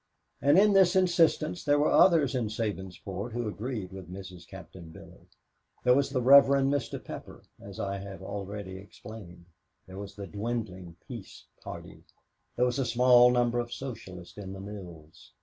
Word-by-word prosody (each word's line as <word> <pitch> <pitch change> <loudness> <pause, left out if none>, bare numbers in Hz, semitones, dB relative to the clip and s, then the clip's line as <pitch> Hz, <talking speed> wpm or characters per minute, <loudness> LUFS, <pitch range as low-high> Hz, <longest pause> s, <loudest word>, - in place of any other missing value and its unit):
And 145 +4 +5
in 205 +1 +6
this 190 -2 +5
insistence 170 -3 +2
there 145 0 +3
were 145 - +2
others 160 -8 +5
in 125 -4 -1
Sabinsport 100 0 -5
who 120 -1 -2
agreed 105 -3 -5
with 95 -2 -10
Mrs. 95 -2 -10
Captain 85 -3 -11
Billy. 80 - -15 0.6
There 125 - +5
was 140 +1 +2
the 130 -3 -1
Rev. 140 +2 +9
Mr. 140 0 +1
Pepper, - - -9 0.2
as 100 +2 -10
I 100 -1 -3
have 95 -1 -9
already 100 -1 -6
explained. 100 -3 -12 0.4
There 95 +1 -10
was 100 0 -8
the 100 - -7
dwindling 100 -5 -5
Peace - - -10 0.2
Party. - - -9 0.5
There 125 - +2
was 125 +2 -1
a - - +2
small 125 0 +6
number 120 -1 +2
of 120 0 -4
Socialists 95 -9 -8
in 95 -1 -7
the 95 - -8
mills. 90 -6 -11
110 Hz, 165 wpm, -29 LUFS, 95-130 Hz, 0.6 s, Rev